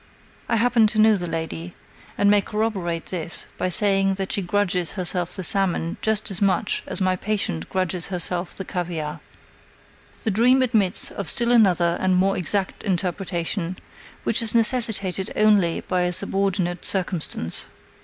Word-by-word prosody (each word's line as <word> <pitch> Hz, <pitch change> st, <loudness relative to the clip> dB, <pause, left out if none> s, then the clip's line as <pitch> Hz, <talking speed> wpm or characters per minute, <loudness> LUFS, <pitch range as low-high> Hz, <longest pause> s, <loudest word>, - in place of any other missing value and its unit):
I -, -, +2 dB
happen 230 Hz, -1 st, +4 dB
to 215 Hz, +1 st, -1 dB
know 215 Hz, 0 st, +6 dB
the 175 Hz, -3 st, -4 dB
lady, 165 Hz, +1 st, -5 dB, 0.4 s
and 200 Hz, -, +3 dB
may 205 Hz, 0 st, +5 dB
corroborate 195 Hz, -6 st, -2 dB
this 170 Hz, -2 st, -3 dB
by 185 Hz, -, 0 dB
saying 195 Hz, +1 st, +2 dB
that 190 Hz, 0 st, -4 dB
she 200 Hz, -, +1 dB
grudges 180 Hz, -3 st, 0 dB
herself 180 Hz, -2 st, -2 dB
the 190 Hz, -, -4 dB
salmon 175 Hz, -2 st, +1 dB
just 220 Hz, -1 st, +1 dB
as 190 Hz, -, -1 dB
much 195 Hz, 0 st, +1 dB
as -, -, -1 dB
my 185 Hz, 0 st, +2 dB
patient 180 Hz, -, -2 dB
grudges 185 Hz, -2 st, -2 dB
herself 180 Hz, -1 st, -3 dB
the 190 Hz, -, -6 dB
caviare. 165 Hz, -5 st, -4 dB, 1.0 s
The 220 Hz, -, 0 dB
dream 250 Hz, +6 st, +4 dB
admits 220 Hz, -7 st, +2 dB
of 200 Hz, -5 st, -4 dB
still 235 Hz, 0 st, +2 dB
another 180 Hz, -7 st, +3 dB
and 185 Hz, -1 st, +2 dB
more 195 Hz, +2 st, +2 dB
exact 190 Hz, +2 st, -2 dB
interpretation, 180 Hz, -1 st, -2 dB, 0.5 s
which 230 Hz, -, +1 dB
is 230 Hz, 0 st, +1 dB
necessitated 220 Hz, -6 st, +2 dB
only 205 Hz, -6 st, +3 dB
by 185 Hz, -1 st, -1 dB
a 180 Hz, 0 st, 0 dB
subordinate 190 Hz, -2 st, 0 dB
circumstance. 175 Hz, -, -2 dB
190 Hz, 155 wpm, -23 LUFS, 175-210 Hz, 1.0 s, know